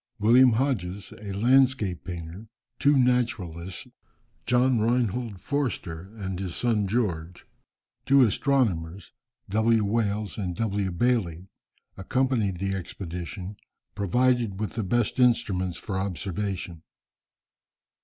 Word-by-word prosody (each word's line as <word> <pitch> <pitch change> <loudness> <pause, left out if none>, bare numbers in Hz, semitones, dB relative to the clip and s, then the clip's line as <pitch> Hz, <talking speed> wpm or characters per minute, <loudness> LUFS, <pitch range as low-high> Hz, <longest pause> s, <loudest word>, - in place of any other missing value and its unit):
William 120 +4 +6
Hodges, 105 -7 -2
a 100 -2 -6
landscape 120 -3 +2
painter, 85 +4 -7 0.3
two 145 0 +4
naturalists, 115 -9 0 0.6
John 125 0 +3
Reinhold 115 -2 0
Forster 100 - -3
and 95 -4 -4
his 95 -3 -4
son 110 -5 +1
George; 90 -6 -2 0.6
two 140 0 +6
astronomers, 100 - 0 0.4
W. 110 +1 +3
Wales 105 -1 -1
and 90 -3 -3
W. 100 -2 -1
Bayley, 95 -3 0 0.5
accompanied 115 -3 0
the 95 +2 -2
expedition, 90 +1 -6 0.4
provided 115 0 +1
with 110 - -2
the 115 - -2
best 120 +5 0
instruments 100 -8 +2
for 95 -2 -4
observation. 95 -2 -4
105 Hz, 105 wpm, -26 LUFS, 95-120 Hz, 0.6 s, William